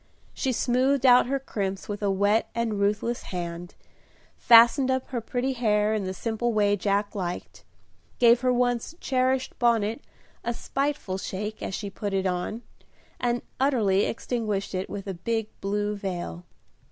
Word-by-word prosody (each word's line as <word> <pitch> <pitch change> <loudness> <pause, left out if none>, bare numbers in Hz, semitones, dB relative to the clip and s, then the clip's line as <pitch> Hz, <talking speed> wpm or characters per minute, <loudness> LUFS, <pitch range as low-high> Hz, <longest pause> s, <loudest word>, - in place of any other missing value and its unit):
She 265 - -1
smoothed 255 +3 +1
out 250 -1 +7
her 275 +2 0
crimps 195 -7 -4
with 205 0 -5
a 205 - +1
wet 205 +3 +2
and 230 -3 -1
ruthless 210 +4 0
hand; 175 0 -6 0.6
fastened 240 +3 +6
up 260 0 -1
her 245 -3 -3
pretty 250 +4 -2
hair 215 -3 +2
in 210 -3 -1
the 185 - -3
simple 230 +4 -1
way 205 -1 +3
Jack 200 +1 0
liked; 180 -3 -5 0.5
gave 240 0 +5
her 255 -1 +2
once 245 +4 0
cherished 260 0 0
bonnet 230 0 +1 0.4
a 240 0 -2
spiteful 275 -10 -2
shake, 210 +3 -5
as 195 - -3
she 200 -2 -5
put 200 +1 -3
it 190 0 0
on, 185 +6 -2 0.6
and 240 0 0 0.2
utterly 220 -8 +3
extinguished 215 -5 -2
it 185 0 -3
with 200 -1 -6
a 195 - -4
big 225 +5 -2
blue 205 +1 -1
veil. 180 -3 -5
215 Hz, 155 wpm, -26 LUFS, 200-245 Hz, 0.6 s, out